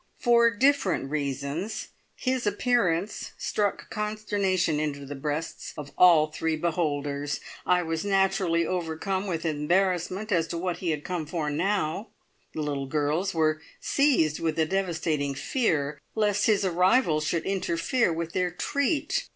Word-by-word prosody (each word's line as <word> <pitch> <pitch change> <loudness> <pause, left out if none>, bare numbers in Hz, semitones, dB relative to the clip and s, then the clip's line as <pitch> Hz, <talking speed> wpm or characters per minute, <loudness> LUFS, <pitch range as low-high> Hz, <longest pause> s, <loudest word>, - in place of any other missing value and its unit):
For 235 -2 +5
different 215 - +1
reasons 145 - -3 0.3
his 255 -3 -1
appearance 205 -4 0
struck 205 -2 -2
consternation 205 -6 0
into 145 -2 -3
the 140 - -6
breasts 150 +3 -4
of 145 -1 -7
all 170 -4 +7
three 160 +1 -1
beholders. 145 -3 -1 0.3
I 180 0 +3
was 165 -1 -2
naturally 190 -4 +2
overcome 185 +3 -2
with 170 -3 -3
embarrassment 180 +6 0
as 165 -3 +2
to 170 - -4
what 175 0 -2
he 180 - -3
had 150 -2 -1
come 175 -4 -3
for 155 -2 -2
now; 195 +3 -1 0.5
the 155 - -2
little 140 -2 -2
girls 155 +6 0
were 155 -1 +2 0.2
seized 250 - +2
with 165 -1 -1
a 160 - +3
devastating 160 -6 -1
fear 150 - 0
lest 210 -2 +2
his 205 -3 +3
arrival 180 -1 +3
should 160 +2 -1
interfere 190 +3 +1
with 165 0 -3
their 180 -1 +1
treat. 285 - -1
170 Hz, 140 wpm, -27 LUFS, 155-200 Hz, 0.5 s, all